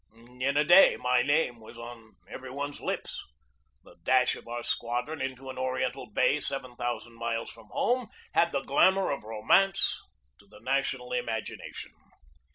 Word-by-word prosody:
In 140 +2 +1
a 150 - +5
day 175 +5 +7
my 125 0 +2
name 145 -5 +1
was 110 +1 -13
on 120 -2 -10
every 130 0 -8
one's 145 +2 -5
lips. - - -3 0.6
The - - -18
dash 130 -1 +3
of - - -13
our 120 0 -4
squadron 125 +8 -2
into 130 0 -4
an 130 - -8
Ori 130 0 -1
ental - - -6
bay - - +3
seven 130 -3 -4
thousand 120 -1 -4
miles 115 -1 -2
from 115 -2 -15
home 245 -1 0 0.3
had 170 0 +3
the 140 - 0
glamour 190 +8 +3
of 140 - -3
romance 110 - +3 0.4
to - - -21
the - - -16
national - - -1
imagination. 485 -1 -4
130 Hz, 165 wpm, -29 LUFS, 120-145 Hz, 0.6 s, day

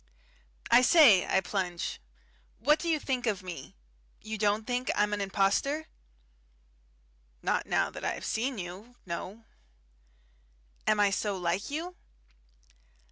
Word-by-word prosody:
"I 240 - +8
say," 250 - +6
I 190 - +2
plunge, 180 -3 -3 0.6
"what 300 +7 +3
do 340 - -3
you 320 - +3
think 255 -4 -2
of 205 -3 -1
me? 170 -7 -8 0.4
You 220 0 -6
don't 210 +1 +1
think 250 +2 -2
I'm 210 0 +1
an 205 - -1
impostor?" 200 +10 +1 1.6
"Not - - 0
now - - +1
that - - -9
I - - 0
have - - -8
seen 245 +3 -1
you. 190 +6 -8
No." 190 +5 -6 1.4
"Am 215 - +3
I 205 -1 +4
so 200 0 -1
like 180 +4 -1
you?" 335 +5 -4
210 Hz, 135 wpm, -29 LUFS, 190-250 Hz, 1.6 s, I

